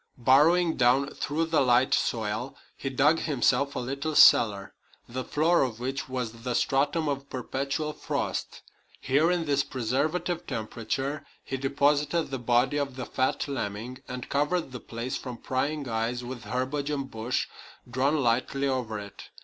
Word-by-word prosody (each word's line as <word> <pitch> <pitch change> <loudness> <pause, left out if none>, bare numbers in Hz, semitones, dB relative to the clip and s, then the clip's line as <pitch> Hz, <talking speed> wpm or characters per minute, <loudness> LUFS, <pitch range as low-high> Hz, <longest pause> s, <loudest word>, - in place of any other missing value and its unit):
Burrowing 160 +7 +4
down 130 +3 +3
through 155 +3 -1
the 160 -2 +2
light 125 0 +4
soil, 110 +3 -1 0.2
he 135 - -4
dug 145 +5 +3
himself 140 -1 +1
a - - -1
little 140 +5 -3
cellar, 100 -8 +6 0.3
the 130 +2 -4
floor 165 +6 +2
of 120 -4 -1
which 130 +2 -3
was 120 -3 -4
the 125 0 -2
stratum 145 +5 +1
of 140 -1 -3
perpetual 140 +4 -3
frost. - - -3 0.4
Here, 150 +5 +2
in 175 -2 +1
this 140 -2 +2
preservative 150 +9 -1
temperature, 130 +4 -3 0.2
he - - -4
deposited 145 +4 +1
the 135 - -2
body 120 +4 +2
of 140 -2 -2
the 130 -1 -5
fat 130 +2 -1
lemming, 120 -1 -4
and 125 0 -6
covered 150 +2 0
the 125 - -6
place 115 +2 -4
from 125 -3 -7
prying 140 +3 -2
eyes 115 +2 -2
with 120 -1 -7
herbage 130 +6 -2
and 140 -2 -3
bush 115 +3 -1 0.4
drawn 130 +5 +1
lightly 130 +4 +1
over 125 -5 -1
it. 100 -1 -9
135 Hz, 155 wpm, -27 LUFS, 120-145 Hz, 0.4 s, cellar